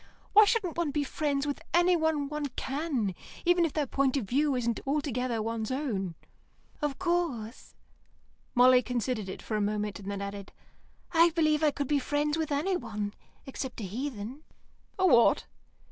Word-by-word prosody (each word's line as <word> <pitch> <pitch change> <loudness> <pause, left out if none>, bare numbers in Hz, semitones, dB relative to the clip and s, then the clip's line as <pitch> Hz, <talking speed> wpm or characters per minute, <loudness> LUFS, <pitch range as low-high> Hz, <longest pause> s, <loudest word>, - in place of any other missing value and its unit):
Why 425 +1 +9
shouldn't 400 -6 0
one 335 -3 +1
be 290 0 0
friends 285 0 -1
with 285 -1 -3
anyone 320 -4 +3
one 300 0 -3
can, 270 - -1 0.3
even 350 0 +4
if 320 - -3
their 300 -2 0
point 275 +1 +1
of 250 - -2
view 280 +3 +2
isn't 235 -2 -1
altogether 255 -5 -1
one's 225 -1 -3
own?" 220 - -2 0.7
"Of 290 -3 -1
course." 320 - -2 0.8
Molly 250 +1 +7
considered 240 -3 -2
it - - -7
for 220 - -3
a 210 - +1
moment, 210 -1 -1
and 200 0 -6
added, 200 0 -6 0.6
"I 335 0 +6
believe 310 -2 +2
I 310 - +5
could 285 -1 -3
be 290 0 +2
friends 295 +2 0
with 320 -2 -2
anyone, 240 - -1 0.3
except 265 -2 -6
a - - -5
heathen." 240 +4 -5 0.6
"A 375 - +2
what?" 240 -9 +5
275 Hz, 160 wpm, -29 LUFS, 225-305 Hz, 0.8 s, Why